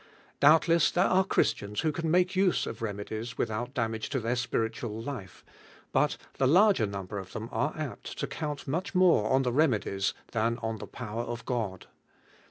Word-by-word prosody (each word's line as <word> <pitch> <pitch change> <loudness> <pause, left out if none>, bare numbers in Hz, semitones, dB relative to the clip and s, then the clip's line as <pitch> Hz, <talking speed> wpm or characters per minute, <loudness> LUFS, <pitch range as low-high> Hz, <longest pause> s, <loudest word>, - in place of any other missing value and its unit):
Doubtless 160 +2 +5
there 180 +2 +2
are 190 +1 +4
Christians 105 - 0
who 155 - +1
can 165 +1 -2
make 180 +3 +3
use 185 -1 +2
of - - -6
remedies 110 +2 -4
without 120 +4 -2
damage 110 -2 -2
to 140 - -1
their 115 +1 -1
spiritual 115 -2 -2
life, 115 -7 -7 0.5
but - - +2 0.2
the 135 - +4
larger 180 - +5
number 100 0 -5
of 95 0 -10
them 110 +1 -5
are 150 - -1
apt 155 -5 -6
to - - -1
count 150 -2 -5
nun 155 +6 0
ii - - -8
more 180 - +4
on 135 +1 +4
the 125 -2 0
remedies 110 -9 +1 0.2
than 115 +1 0
on 110 -1 -2
the - - -7
power 115 -2 -5
of 120 0 -5
God. 110 -7 -3
120 Hz, 180 wpm, -29 LUFS, 110-155 Hz, 0.5 s, Doubtless